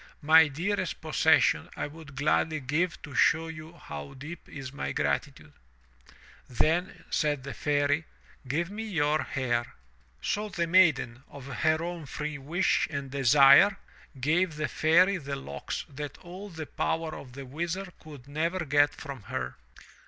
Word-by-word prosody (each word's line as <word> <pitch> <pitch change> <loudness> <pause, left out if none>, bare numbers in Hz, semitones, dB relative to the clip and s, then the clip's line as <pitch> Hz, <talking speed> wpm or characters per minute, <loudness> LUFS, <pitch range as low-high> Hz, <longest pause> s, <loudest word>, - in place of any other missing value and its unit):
My 160 +2 +7
dearest 175 +8 -2
possession - - +3
I - - -2
would 150 -2 -11
gladly 155 +2 +1
give 155 +7 -1
to 145 - -9
show 165 +4 +3
you 160 0 -9
how 75 - -9
deep 150 +6 -9
is 140 -2 -8
my - - -3
gratitude." 75 - -2 1.0
'Then," 160 - 0
said 145 -4 0
the 140 - -6
Fairy, 145 +1 +1 0.4
"give 170 +7 -1
me 215 +2 -5
your 155 -8 +1
hair." 120 -3 -2 0.4
So 210 +1 -2
the 170 -3 -1
Maiden, 160 -8 +3
of 140 -2 -11
her 155 +4 0
own 170 -3 -5
free 150 +1 -4
wish 165 +7 +1
and 140 -3 -5
desire, 140 +8 +6 0.4
gave 160 +5 +1
the 155 0 -1
Fairy 175 +8 +4
the 140 -3 -5
locks 105 - -5
that 145 0 -7
all 185 +4 -9
the 160 -3 -6
power 160 +1 -2
of 125 -3 -10
the 135 +1 -8
Wizard 175 +7 -4
could 145 -4 -12
never 160 +4 -1
get 145 +1 +3
from 140 -7 -8
her. - - -3
150 Hz, 150 wpm, -28 LUFS, 140-170 Hz, 1.0 s, My